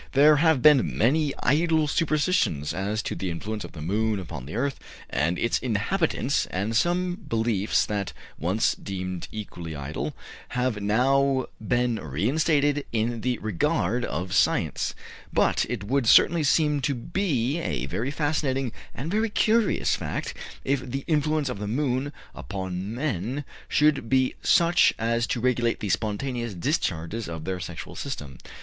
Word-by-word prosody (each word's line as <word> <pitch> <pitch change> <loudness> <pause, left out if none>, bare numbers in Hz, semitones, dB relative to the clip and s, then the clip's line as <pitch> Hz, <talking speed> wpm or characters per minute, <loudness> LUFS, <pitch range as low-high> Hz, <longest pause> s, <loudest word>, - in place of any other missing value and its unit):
There 150 +2 +6
have 160 -4 +3
been 150 -4 +5
many 145 +5 +3
idle 160 +3 +3
superstitions 150 - +1
as 105 +3 -2
to - - -3
the 95 - -3
influence 105 +6 -4
of - - -9
the 75 -4 -7
moon 105 +4 0
upon 75 -8 -7
the 80 - -6
earth 135 +3 -1 0.3
and 80 +7 +1
its 115 - +1
inhabitants, 130 - 0
and 100 +5 -2
some 175 +5 +1
beliefs 110 -3 +1
that 100 -2 -2 0.3
once 95 +7 +1
deemed 95 -2 -5
equally 85 -7 -6
idle 70 +2 -4 0.4
have 125 -4 0
now 130 +5 +2 0.2
been 120 +1 +1
re 80 +3 -2
instated 145 0 +2
in 115 0 -1
the 125 0 0
regard 110 +3 0
of 90 -3 -3
science; - - +1 0.4
but - - +2
it 120 -5 -3
would 125 +3 0
certainly 165 +7 +6
seem 150 0 +3
to 140 +1 0
be 145 - -1
a 165 - -2
very 120 +5 -2
fascinating 140 -4 0 0.2
and 150 +7 -4
very 220 +2 +1
curious 220 +1 +2
fact - - -4 0.3
if 140 0 +2
the 135 +2 -4
influence 155 -1 +1
of 125 -6 -4
the 105 - -4
moon 130 +3 0 0.2
upon 95 - -5
men 130 - -2 0.2
should 150 -6 +2
be 130 -1 +3
such 170 +1 +4
as 115 +1 0
to 120 - -1
regulate 120 -1 +1
the 105 - -3
spontaneous 115 +3 -2
discharges 100 - -2
of 80 -2 -6
their 95 -1 -2
sexual 85 -1 -7
system. 75 - -6
120 Hz, 150 wpm, -26 LUFS, 100-145 Hz, 0.4 s, There